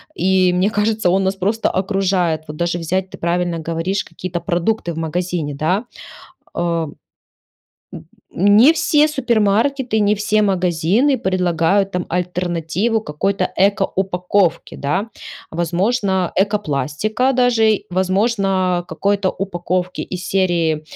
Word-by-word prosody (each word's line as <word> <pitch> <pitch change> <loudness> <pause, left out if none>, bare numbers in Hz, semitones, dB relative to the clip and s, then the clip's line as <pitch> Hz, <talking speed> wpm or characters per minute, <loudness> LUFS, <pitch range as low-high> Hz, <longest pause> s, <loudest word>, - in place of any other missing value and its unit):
И, 185 -1 +2
мне 185 +3 +2
кажется, 215 -2 0
он 190 +2 +2
нас 190 +1 0
просто 205 +4 0
окружает. 185 -4 0
Вот 150 - -7
даже 170 +1 -1
взять, 185 +3 -2
ты - - -10
правильно 170 0 -1
говоришь, 165 +4 -1
какие-то 175 +1 -6
продукты 175 +1 -1
в - - -10
магазине, 165 -2 -2
да? 170 - 0 0.7
Ам, 170 -3 -2 1.0
н - - -10 0.5
не 260 +8 +7
все 310 -2 +3
супермаркеты, 240 -2 +1
не 205 0 +3
все 210 +1 +1
магазины 190 - +2
предлагают 185 0 +1
там 180 -1 -2
альтернативу 180 +4 -1
какой-то 195 +2 -1
ЭКО-упаковке, 190 -2 0
да? 185 +10 -2 0.4
Возможно, 185 +3 0
ЭКО-пластика, 205 - 0
даже, 235 -4 +2
возможно, 190 -1 +1
какой-то 200 +3 0
упаковки 180 -1 -3
из 180 -1 -6
серии, 170 -5 +1
185 Hz, 115 wpm, -19 LUFS, 175-205 Hz, 1.0 s, не